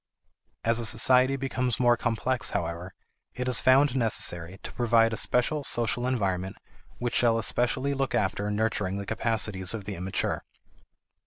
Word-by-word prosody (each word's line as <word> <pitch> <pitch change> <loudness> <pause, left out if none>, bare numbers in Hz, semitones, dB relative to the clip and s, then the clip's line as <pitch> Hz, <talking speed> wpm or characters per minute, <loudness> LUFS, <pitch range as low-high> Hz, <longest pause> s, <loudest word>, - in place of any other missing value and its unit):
As 115 +1 +2
a 115 - -1
society 125 +3 +5
becomes 130 -3 -3
more 120 -1 +4
complex, 120 +2 -2
however, 85 +2 -5 0.4
it 125 0 -4
is 125 - +3
found 135 +1 +3
necessary 95 -7 +1
to - - -8
provide 115 -1 +2
a - - -1
special 140 +7 0
social 120 0 +1
environment 95 -7 -2 0.4
which 120 0 -4
shall 115 -2 +2
especially 125 +4 0
look 135 -2 -2
after 105 -1 -1
nurturing 105 -2 -2
the 100 - -6
capacities 110 -3 -1
of 105 -3 -8
the 100 - -5
immature. 95 +1 -3
115 Hz, 150 wpm, -26 LUFS, 100-125 Hz, 0.4 s, society